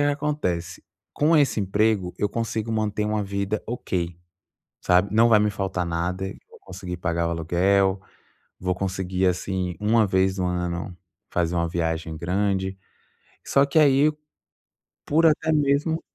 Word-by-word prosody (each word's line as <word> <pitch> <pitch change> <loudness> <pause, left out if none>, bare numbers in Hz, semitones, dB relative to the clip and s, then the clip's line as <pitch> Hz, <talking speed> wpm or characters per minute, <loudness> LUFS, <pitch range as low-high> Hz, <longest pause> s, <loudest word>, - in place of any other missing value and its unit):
acontece 145 - -1 0.3
com 155 +2 +3
esse 140 -7 +3
emprego, 100 -1 +1
eu 105 - +1
consigo 115 0 -3
manter 105 -1 -1
uma 105 0 0
vida 100 +1 -2
ok, 90 -7 -3 0.6
sabe, 90 +3 +2
não 115 +2 +5
vai 110 -2 +6
me 105 0 +2
faltar 95 -2 -2
nada. 85 +3 -2 0.2
Vou - - -17
conseguir 95 -1 -7
pagar 85 -1 -1
o - - -2
aluguel, 95 +4 +1 0.6
vou 90 0 -1
conseguir, 95 -1 -1
assim, 90 0 -1
1 110 +1 +3
vez 95 0 +1
no 90 - 0
ano, 90 0 -3 0.3
fazer 85 0 0
uma 85 -1 0
viagem 80 -1 -2
grande. 95 +3 -1 0.7
Só 140 0 +3
que 140 +3 +2
aí 145 0 +5 0.9
por 160 +3 +3
até 160 0 +3
mesmo 150 +2 +1
95 Hz, 140 wpm, -24 LUFS, 90-110 Hz, 0.9 s, vai